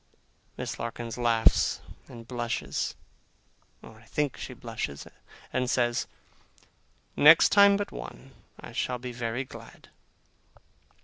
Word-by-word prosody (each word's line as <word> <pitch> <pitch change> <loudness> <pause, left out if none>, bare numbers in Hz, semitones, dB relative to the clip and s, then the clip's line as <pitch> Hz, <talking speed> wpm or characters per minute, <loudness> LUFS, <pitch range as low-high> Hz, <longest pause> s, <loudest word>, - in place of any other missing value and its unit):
Miss - - -5
Larkins 115 -1 -5
laughs 115 -2 +3 0.3
and 115 -1 -11
blushes 120 -2 -3 0.9
(or 110 -1 -13
I 115 - -19
think 145 +3 -1
she - - -7
blushes), 70 0 -5 0.5
and 125 -1 0
says, 120 -1 +1 1.1
'Next 155 +3 +8
time 200 -1 +6
but 205 - -4
one, - - -9 0.3
I - - -10
shall 125 - -2
be 125 0 -6
very 120 +1 -3
glad. 130 - -13
120 Hz, 115 wpm, -28 LUFS, 115-130 Hz, 1.1 s, Next